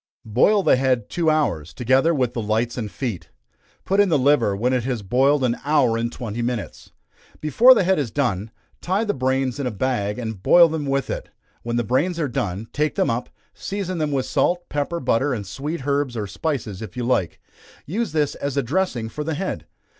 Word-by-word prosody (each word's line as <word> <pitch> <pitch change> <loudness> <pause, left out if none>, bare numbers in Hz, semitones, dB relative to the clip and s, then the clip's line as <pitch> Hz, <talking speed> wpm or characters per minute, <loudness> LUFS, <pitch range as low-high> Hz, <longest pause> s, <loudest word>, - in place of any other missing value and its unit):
_ - - -10
Boil 200 - +4
the - - +4
head 130 -4 0
two 170 -2 +1
hours, 90 - 0
together 130 +6 +3
with 130 -7 0
the 115 - -2
lights 110 +3 -1
and 110 -4 -4
feet. 115 -5 -5 0.6
Put 195 +1 +1
in 205 -2 +5
the 160 - +3
liver 130 -7 +3
when 125 +6 0
it 125 -2 +1
has 120 -4 -3
boiled 135 +7 +2
an 120 -1 0
hour 140 -5 +3
and 115 +1 -1
twenty 120 -1 -5
minutes. 120 -3 -4 0.5
Before 230 - +6
the 210 - +3
head 190 -1 +2
is 135 -5 -1
done, 110 -6 -1 0.3
tie 190 +5 0
the 210 - 0
brains 130 0 -1
in 140 - -1
a - - 0
bag, 105 -2 -1
and 110 -5 -5
boil 170 - +6
them 155 -2 -3
with 135 0 -1
it; - - -5 0.3
when 120 0 -3
the 120 - +1
brains 145 - 0
are 150 - 0
done, 105 -3 -3
take 150 +1 0
them - - +1
up, 120 +2 -3 0.2
season 190 -3 -4
them 155 -1 0
with 135 -2 0
salt, 175 +5 0
pepper, 145 +4 -2
butter, 130 +1 +1
and 105 -3 -5
sweet 135 - -5
herbs, 140 -4 0
or 105 - -2
spices 110 - -3
if 110 0 -8
you 125 - -2
like 115 -8 0 0.5
use 220 +9 -2
this 150 -2 0
as 140 0 -4
a 140 - +2
dressing 130 -4 -1
for 150 +7 -5
the 160 0 -2
head. 145 - -4
130 Hz, 215 wpm, -22 LUFS, 115-155 Hz, 0.6 s, Before